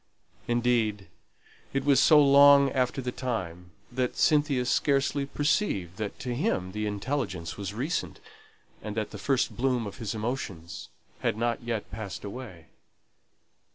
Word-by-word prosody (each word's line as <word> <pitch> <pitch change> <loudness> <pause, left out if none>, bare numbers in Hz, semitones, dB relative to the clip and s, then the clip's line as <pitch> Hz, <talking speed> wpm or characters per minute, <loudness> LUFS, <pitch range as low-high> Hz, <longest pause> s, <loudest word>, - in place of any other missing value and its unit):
Indeed, 120 -4 +1 0.6
it 135 0 -1
was 140 -3 +5
so 155 +1 +7
long 140 -1 +7
after 130 0 0
the 125 - -2
time, 90 -10 -4 0.2
that 125 0 -2
Cynthia 145 -4 +3
scarcely 140 +1 +1
perceived 140 - 0
that 105 -2 -4
to 125 -2 -3
him 120 - -1
the 105 +1 -3
intelligence 100 - -3
was 100 0 -5
recent, 145 - -3 0.6
and 105 0 -6
that 110 -1 -2
the 105 - -8
first 135 +4 0
bloom 125 -2 0
of 100 - -7
his 115 -4 -4
emotions 105 -8 -5 0.3
had - - -1
not 120 0 -1
yet 115 -3 -4
passed 105 -2 -6
away. 100 -7 -9
120 Hz, 140 wpm, -28 LUFS, 105-135 Hz, 0.6 s, so